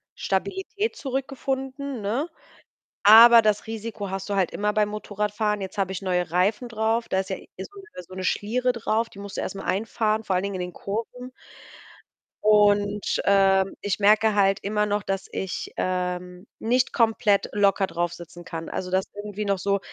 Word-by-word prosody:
Stabilität 395 +3 -2
zurückgefunden, 270 -1 -4
ne? 235 +11 -1 0.8
Aber 230 +2 +10
das 210 -1 +1
Risiko 220 -2 -5
hast 190 +1 -5
du - - 0
halt 185 -3 +1
immer 210 +1 0
beim 210 -1 +2
Motorradfahren. 210 0 -2
Jetzt 190 +1 -6
habe 190 -1 -1
ich 190 - -4
neue 180 -3 -1
Reifen 200 +8 +1
drauf. 225 +1 0
Da 190 - +1
ist 190 - -6
ja - - -2 0.2
so 405 0 -9
'ne 395 - -11
so 185 - -11
'ne 185 0 -5
Schliere 250 +7 0
drauf, 230 -1 -1
die - - -15
musst 200 0 -8
du - - -2
erst - - -4
mal 195 - -7
einfahren, 220 +1 0
vor 190 - -1
allen 180 - 0
Dingen 200 0 -3
in 185 - -4
den - - -22
Kurven. 230 +7 -5 1.2
Und, 205 -1 +3
ähm, 195 -1 +3
ich 205 0 -2
merke 215 +1 +4
halt 195 -1 +3
immer 210 +1 0
noch, 205 0 0
dass 195 0 -4
ich, 190 - -4
ähm, 180 0 -3
nicht 250 +3 +1
komplett 220 -3 +2
locker 200 -1 +2
draufsitzen 175 0 -5
kann. 165 -2 -6
Also 180 -1 -5
dass 190 0 +1
irgendwie 205 0 -5
noch 200 -1 +1
so, 200 +1 +1
205 Hz, 180 wpm, -25 LUFS, 195-225 Hz, 1.2 s, Aber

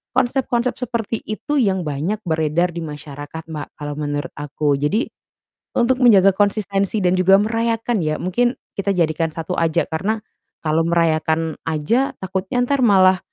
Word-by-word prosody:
konsep-konsep 250 -1 +1
seperti 230 -3 -2
itu 290 +8 -3
yang 190 -6 +1
banyak 155 +9 -2
beredar 160 +2 +1
di 170 - -4
masyarakat, 150 +1 -8
Mbak, 155 -3 -6
kalau 145 -1 -4
menurut 145 -1 -2
aku. 145 0 0
Jadi 175 - 0 0.7
untuk 255 +1 +2
menjaga 195 -5 +7
konsistensi 200 0 +1
dan 180 +1 +3
juga 190 +1 +5
merayakan 225 +1 0
ya, 155 0 0
mungkin 240 +8 +1 0.2
kita 200 0 0
jadikan 160 -1 +1
satu 165 +3 -4
aja, 165 0 +1
karena 195 +8 -1 0.4
kalau 160 +1 +2
merayakan 160 -1 +1
aja 165 - +1
takutnya 190 +5 -2
entar 280 +3 0
malah 190 -4 +5
185 Hz, 145 wpm, -20 LUFS, 160-225 Hz, 0.7 s, menjaga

